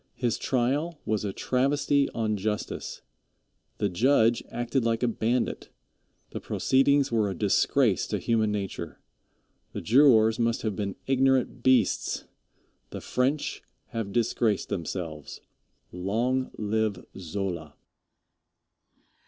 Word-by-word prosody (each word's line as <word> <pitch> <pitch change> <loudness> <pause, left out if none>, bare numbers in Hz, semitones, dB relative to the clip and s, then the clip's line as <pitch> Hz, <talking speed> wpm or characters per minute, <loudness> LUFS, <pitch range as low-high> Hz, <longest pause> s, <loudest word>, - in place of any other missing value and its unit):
His 120 -3 -1
trial 140 +6 0
was 110 -1 -1
a 100 - -2
travesty 140 +5 +1
on 110 -2 -1
justice. 105 +1 -4 0.7
The 105 - +1
judge 115 +4 +3
acted 120 +2 -1
like 115 +1 0
a - - +3
bandit. 115 +2 -1 0.6
The - - -5
proceedings 140 +1 +2
were 110 -3 +2
a 95 - -4
disgrace - - +2
to - - -1
human 110 -2 +1
nature. 100 -2 -5 0.7
The - - -4
jurors 115 -3 +5
must 115 0 0
have 110 -3 -1
been 100 -1 -3
ignorant 135 -2 +2
beasts. 125 -5 +2 0.6
The - - -6
French 135 +4 -1 0.3
have 115 -3 -4
disgraced 115 -2 0
themselves. 85 -5 -5 0.5
Long 115 +8 -1
live 110 -2 -1
Zola. 85 -4 -5
115 Hz, 110 wpm, -27 LUFS, 100-130 Hz, 0.7 s, jurors